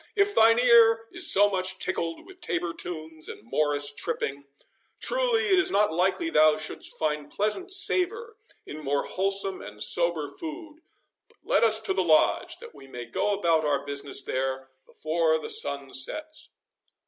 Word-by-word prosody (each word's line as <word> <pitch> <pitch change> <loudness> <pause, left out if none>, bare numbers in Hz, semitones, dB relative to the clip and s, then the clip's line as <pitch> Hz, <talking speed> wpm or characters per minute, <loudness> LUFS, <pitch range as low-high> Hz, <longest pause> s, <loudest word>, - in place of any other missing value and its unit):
If 405 0 +2
thine 230 - +5
ear 230 -2 +5
is - - +3
so 205 +1 +6
much 185 -2 -1
tickled 165 -3 -3
with 375 -1 -16
tabor 170 0 -2
tunes 160 -3 -7
and - - -10
morris 145 +3 -1
tripping, 140 0 -4 0.5
truly - - 0
it 380 -1 +4
is 375 0 +2
not 210 - +1
likely 195 - 0
thou 155 - +4
shouldst 155 0 -1
find 150 -2 -2
pleasant 215 - -1
savour 415 +4 +1 0.3
in 155 +1 -9
more 140 0 -1
wholesome 195 0 -1
and 105 0 -3
sober 170 -4 0
food. 315 -1 -9 0.5
But 465 - -26
let - - +1
us 220 -1 +4
to 220 - 0
the 190 -1 0
Lodge, 155 -3 +2
that 475 -1 -13
we 135 - -15
may 125 -2 -8
go 200 - -1
about 165 -5 +1
our 145 -2 -1
business 140 -1 -1
there 130 0 -3 0.2
before 160 0 0
the 155 - -7
sun 140 -1 -1
sets." 310 - -3
175 Hz, 165 wpm, -26 LUFS, 150-245 Hz, 0.5 s, so